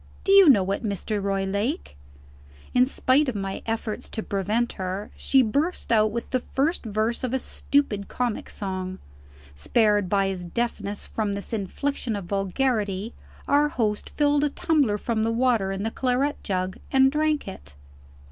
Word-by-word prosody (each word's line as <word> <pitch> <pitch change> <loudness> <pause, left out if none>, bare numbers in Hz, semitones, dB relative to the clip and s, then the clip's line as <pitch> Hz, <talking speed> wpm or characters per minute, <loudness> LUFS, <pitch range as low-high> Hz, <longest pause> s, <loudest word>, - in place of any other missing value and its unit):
Do 390 - +1
you 395 -4 +8
know 195 -7 +4
it, 200 - -2
Mr. 205 0 -2
Roylake?" 200 - -2 0.8
In 250 0 +5
spite 275 +1 +2
of 245 - -4
my 195 -1 -3
efforts 225 -1 -3
to 220 - -4
prevent 210 +5 -1
her, 190 +2 -4
she 270 -1 +3
burst 285 +10 -1
out 215 -1 +4
with 230 +2 -5
the 255 - +2
first 285 +7 -1
verse 220 +2 -1
of 255 0 -1
a - - +3
stupid 255 -6 0
comic 245 -3 -2
song. 185 -2 -4 0.6
Spared 205 - +2
by 195 -1 +2
his 185 -2 -4
deafness 205 +1 -3
from 210 -2 -2
this 200 +3 -5
infliction 225 +3 -2
of 200 -3 -5
vulgarity, 205 +1 -1 0.3
our 290 +1 +4
host 215 -6 -1
filled 290 -1 +2
a 295 - +2
tumbler 285 -8 +1
from 225 +1 -1
the 225 +1 +1
water 230 -5 +2
in 195 +1 -3
the 225 - -1
claret 265 +4 0
jug, 185 -1 -2
and 265 0 +5
drank 305 0 0
it. 70 0 -10
220 Hz, 165 wpm, -25 LUFS, 195-260 Hz, 0.8 s, you